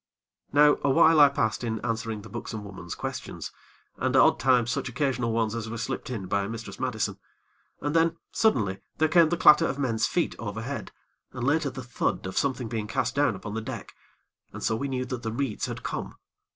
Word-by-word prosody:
Now 145 0 +5
awhile 160 +3 +5
I 145 -1 +9
passed 110 -4 -1
in 110 -2 -2
answering 115 -2 -2
the 110 - -11
buxom 110 -2 -6
woman's 95 -3 -7
questions, - - -5 0.5
and - - 0
odd - - +5
times 125 -2 +3
such 130 - -2
occasional 125 -3 0
ones 115 -1 0
as 115 -1 -4
were 115 - -5
slipped 130 +3 -4
in 110 -7 -4
by 100 +2 0
Mistress 110 -3 -7
Madison; 110 -6 -2 0.6
and 145 +2 -2
then, 165 0 +3
suddenly 110 - +1 0.2
there 155 - +3
came 165 0 +5
the 175 - 0
clatter 165 +1 +7
of 135 - -3
men's 120 -6 +1
feet - - 0
overhead, - - -5 0.4
and, 125 - -3
later, 145 +1 +2
the 130 -1 -7
thud 120 -5 -2
of 95 - -5
something 130 -3 0
being 110 -2 -3
cast 115 - -1
down 140 -6 +2
upon 100 +2 -7
the 115 - -2
deck, 115 -2 -7 0.6
and - - -8
so 110 - +1
we 140 +5 -2
knew 130 -1 -2
that 125 -1 -5
the 110 - -3
reeds 120 -2 -2
had - - -6
come. - - -4
120 Hz, 200 wpm, -27 LUFS, 110-140 Hz, 0.6 s, I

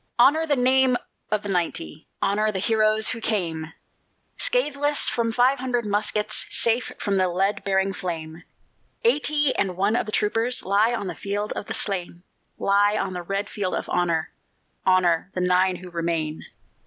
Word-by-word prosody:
Honor 300 +7 +4
the 290 - +2
name 260 0 +3 0.3
of 215 -1 -1
the 205 - -5
ninety; 170 - -3 0.2
Honor 215 +2 +1
the 195 - -3
heroes 215 +1 +3
who 230 - -3
came 165 -8 -2 0.6
Scatheless 295 - +1
from 230 -1 0
five 250 +4 +3
hundred 245 -2 -1
muskets, 210 +1 0
Safe 230 +1 +1
from 200 -2 -1
the 185 -1 +3
lead 190 +3 -1
bearing 195 0 +1
flame. 165 -3 -5 0.6
Eighty 295 - +2
and 185 -2 -1
one 200 +4 +1
of 235 - -1
the - - -4
troopers 230 +5 +1
Lie 210 +5 +2
on 210 - -4
the 185 - -4
field 205 +1 -3
of - - -6
the - - -4
slain 180 -3 -2 0.3
Lie 205 +1 +2
on 190 -2 -2
the 180 - -4
red 195 +3 -3
field 200 -4 -3
of - - -4
honor: 170 -3 0 0.6
Honor 180 -2 +3
the 180 - -1
nine 180 +1 +2
who 180 0 -10
remain! 165 -2 -2
205 Hz, 165 wpm, -24 LUFS, 180-235 Hz, 0.6 s, Honor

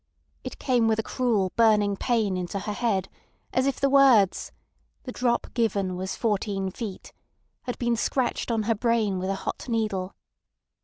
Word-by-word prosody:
It - - -7
came 245 -4 +2
with 220 -1 +2
a 220 - -1
cruel 220 -8 0
burning 210 -3 +4
pain 215 -3 0
into 180 +2 -3
her 210 - -3
head, 205 -4 0 0.5
as 260 +1 +2
if 275 - -1
the 275 - +3
words 265 -8 +4 0.5
"The 255 - -6
drop 240 -1 -1
given 200 -6 0
was 185 +1 -4
fourteen 200 -3 -1
feet" 205 -2 -7 0.5
had 245 - -4
been 240 -1 0
scratched 245 +2 -1
on 225 -2 0
her 225 +2 +1
brain 220 -3 0
with 185 +1 -3
a 195 - 0
hot 220 - -5
needle. 210 -5 -1
220 Hz, 165 wpm, -26 LUFS, 195-240 Hz, 0.5 s, burning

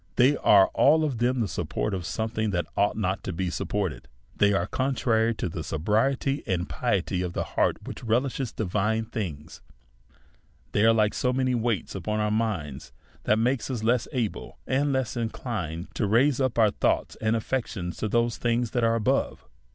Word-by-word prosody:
They 130 +4 +5
are 100 -2 +5
all 155 +3 +4
of 135 -7 -1
them 125 +1 +1
the 110 - 0
support 65 -5 -3
of 90 -3 -3
something 110 +3 -2
that 90 -3 -1
ought 100 - +1
not 95 -2 -1
to - - -3
be 90 +1 -2
supported: 90 -9 -3 0.3
they 100 0 +4
are 100 - +1
contrary 120 -4 +1
to - - -2
that 80 0 -5
sobriety 115 - 0
and 90 -2 -1
piety 95 -6 -1
of 90 -1 -4
heart - - 0
which - - -8
re 115 0 +3
lishes 130 -1 -3
divine 110 +2 0
things; 85 -10 -6 1.1
they 105 - +2
are 115 - +7
like 105 -2 +2
so 125 - 0
many 130 0 +1
weights 115 -3 -1
upon 105 +3 -2
our 105 0 0
minds, 95 -11 -2 0.3
that 105 - +3
make 125 +4 +2
us 120 -4 -3
less 120 +1 +2
able 120 -7 -3
and 140 +2 +1
less 130 -3 -1
inclin 110 -8 -3
ed - - -18
to 105 - -1
raise 125 +6 +3
up 130 -3 0
our 110 -3 +5
thoughts - - 0
and 110 +1 +2
affections 110 -7 -3
to - - -2
the 115 +2 +3
things 120 0 -1
that 120 - 0
are 115 0 +3
above. 110 -2 0
110 Hz, 185 wpm, -26 LUFS, 95-125 Hz, 1.1 s, are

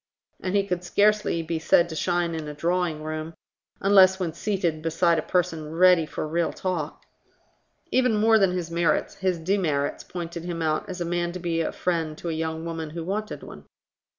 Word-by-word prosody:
And 185 +1 -2
he 200 -1 +3
could 180 -2 -2
scarcely 205 -2 +2
be 165 0 -2
said 170 +1 +4
to 160 - -6
shine 175 0 0
in 160 -2 -4
a 150 - -6
drawingroom, 155 -1 -2 0.5
unless 190 -1 +6
when 170 -4 -2
seated 175 -4 -1
beside 165 +1 +2
a - - 0
person 165 -3 -1
ready 180 -2 +5
for 155 - -4
real 170 +2 0
talk. 175 -5 -4 0.9
Even 250 -3 +3
more 220 +1 +5
than 195 -3 +3
his 175 -2 -3
merits, 170 0 +1
his 185 -2 0
demerits 160 -5 0
pointed 170 -1 -6
him 170 -1 -3
out 155 +3 -1
as 185 -1 -5
a - - 0
man 175 0 -1
to 180 - -5
be 170 -1 -1
a - - -1
friend 165 -4 -2
to 170 - -5
a - - -1
young 160 0 -3
woman 165 -2 -4
who 165 +2 -6
wanted 210 +5 -4
one. - - -11
170 Hz, 190 wpm, -25 LUFS, 160-185 Hz, 0.9 s, unless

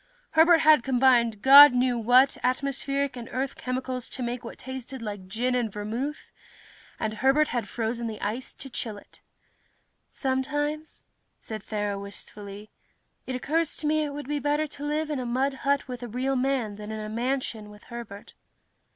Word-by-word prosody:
Herbert 325 +1 +6
had 310 -3 +6
combined 240 -4 +3
God 280 +1 +10
knew 250 0 +2
what 245 +4 +4
atmospheric 275 +1 -1
and 240 -2 -8
earth 265 +1 -2
chemicals 255 -1 -4
to 255 - -5
make 240 +1 -3
what 230 - -8
tasted 260 0 -7
like 205 -4 -6
gin 240 +6 -1
and 240 -4 0
vermouth, 230 +9 -4 0.7
and 215 0 -2
Herbert 270 +7 +3
had 240 -2 -2
frozen 230 0 -2
the 215 -2 -6
ice 230 +6 -4
to 270 - -8
chill 220 -4 -4
it. - - -16 0.9
"Sometimes," 290 +3 -2 0.3
said 215 -2 -7
Thera 205 -1 -3
wistfully, 200 +1 -9 0.6
"it 255 - -3
occurs 310 +5 -1
to 305 - -5
me 310 +1 +2
it 295 - -2
would 290 -1 -7
be 295 0 -1
better 295 +2 +1
to 290 -1 -10
live 300 +1 -1
in 290 - -1
a - - -3
mud 265 +3 0 0.2
hut 280 -1 +2
with 250 -1 -6
a 245 - -5
real 255 +4 -1
man 250 -5 0
than 210 0 -7
in 220 - -4
a 215 - -5
mansion 235 -1 -3
with 210 0 -14
Herbert." 235 -4 -9
255 Hz, 175 wpm, -26 LUFS, 225-280 Hz, 0.9 s, God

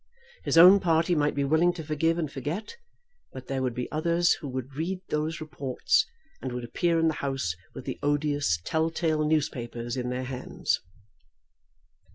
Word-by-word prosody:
His - - +1
own 185 +4 +10
party 165 -1 +2
might 150 -2 +1
be 140 - +1
willing 160 +5 +3
to 165 - -7
forgive 160 +2 +1
and 155 -4 -2
forget; 150 - -4 0.6
but 130 -1 -8
there 135 +1 -2
would 125 -2 -1
be 125 - -3
others 170 +2 +2
who 150 - -6
would 130 +1 -5
read 170 +6 -2
those 155 +2 -1
reports, 140 -5 0 0.3
and 130 - -4
would 125 0 -4
appear 170 +8 0
in 165 0 +3
the 160 - +2
House 135 -11 -1 0.2
with - - -8
the 130 - -5
odious 145 - +1
tell 160 - 0
tale 160 -2 0
newspapers 120 -6 -1
in 125 -1 -2
their 125 +1 -2
hands. 130 0 -2
150 Hz, 175 wpm, -27 LUFS, 130-165 Hz, 0.6 s, own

